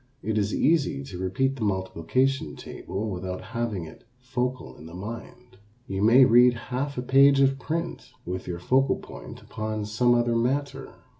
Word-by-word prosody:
It 110 Hz, -, -1 dB
is 100 Hz, 0 st, 0 dB
easy 140 Hz, -, +1 dB
to 70 Hz, +6 st, -8 dB
repeat 130 Hz, +9 st, 0 dB
the -, -, -9 dB
multiplication 95 Hz, -, 0 dB
table 105 Hz, +3 st, -6 dB
without 90 Hz, 0 st, -4 dB
having 115 Hz, -7 st, -2 dB
it 80 Hz, -, -13 dB
focal 125 Hz, 0 st, -3 dB
in 80 Hz, -, -11 dB
the 85 Hz, -, -10 dB
mind. 115 Hz, +2 st, -9 dB, 0.3 s
You 95 Hz, -2 st, -3 dB
may 120 Hz, +5 st, +7 dB
read 120 Hz, +1 st, +6 dB, 0.2 s
half 140 Hz, +2 st, -2 dB
a 125 Hz, -, -2 dB
page 135 Hz, +2 st, +5 dB
of 135 Hz, 0 st, +3 dB
print 155 Hz, -3 st, -4 dB
with 90 Hz, +1 st, -5 dB
your 90 Hz, -1 st, -3 dB
focal 130 Hz, +10 st, +2 dB
point -, -, -11 dB
upon 110 Hz, -1 st, -4 dB
some 120 Hz, +4 st, +2 dB
other 120 Hz, 0 st, +1 dB
matter. 135 Hz, +3 st, -1 dB
120 Hz, 165 wpm, -26 LUFS, 95-130 Hz, 0.3 s, may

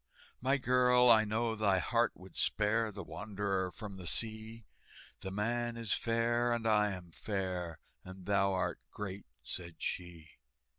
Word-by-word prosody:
"My 135 Hz, +3 st, +3 dB
girl, 125 Hz, -1 st, +5 dB
I 110 Hz, -1 st, +6 dB
know 110 Hz, +2 st, 0 dB
thy 105 Hz, -3 st, +3 dB
heart 115 Hz, +5 st, +2 dB
would 95 Hz, 0 st, -14 dB
spare 110 Hz, +1 st, +2 dB
The 100 Hz, -1 st, -7 dB
wanderer 100 Hz, -1 st, -2 dB
from 100 Hz, 0 st, -8 dB
the 90 Hz, -2 st, -6 dB
sea." 110 Hz, +1 st, -1 dB, 0.5 s
"The 95 Hz, -, -5 dB
man 120 Hz, +4 st, -1 dB
is 115 Hz, -3 st, -1 dB
fair, 120 Hz, +1 st, +1 dB
and 115 Hz, -1 st, -2 dB
I 105 Hz, -1 st, +4 dB
am 90 Hz, -3 st, -7 dB
fair, 90 Hz, -4 st, -3 dB, 0.3 s
And 95 Hz, 0 st, -10 dB
thou 100 Hz, 0 st, +3 dB
art 95 Hz, -, -1 dB
great," 100 Hz, -3 st, -6 dB, 0.2 s
said 85 Hz, +3 st, -5 dB
she. 85 Hz, -3 st, -5 dB
105 Hz, 150 wpm, -34 LUFS, 95-115 Hz, 0.5 s, I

